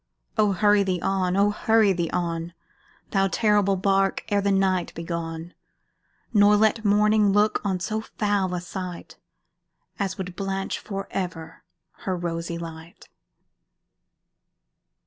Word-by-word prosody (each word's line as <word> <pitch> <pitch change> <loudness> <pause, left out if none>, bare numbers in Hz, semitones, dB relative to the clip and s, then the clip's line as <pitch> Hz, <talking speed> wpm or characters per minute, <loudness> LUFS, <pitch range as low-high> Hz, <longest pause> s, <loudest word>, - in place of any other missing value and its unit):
Oh! 210 -2 +3
hurry 205 +1 +4
thee 185 -2 0
on 185 -1 0
oh! 205 +1 +4
hurry 220 -1 +3
thee 170 -2 -2
on, 170 -1 -3 0.6
Thou 195 -1 +2
terrible 205 -1 +2
bark, 195 +1 +1
ere 205 -1 +2
the 200 0 +1
night 190 -2 +1
be 165 - -5
gone, 165 0 -5 0.8
Nor 205 -1 +6
let 220 +1 +2
morning 210 0 +4
look 210 +2 +2
on 190 -3 -1
so 215 +4 -2 0.2
foul 200 -3 +1
a 175 - -3
sight 180 -1 -7 0.8
As 195 -1 -2
would 185 -2 -6
blanch 195 0 -3
for 195 -2 -6
ever 165 -3 -5 0.4
her 185 -1 0
rosy 170 -1 -3
light! 165 0 -10
195 Hz, 130 wpm, -25 LUFS, 175-205 Hz, 0.8 s, Nor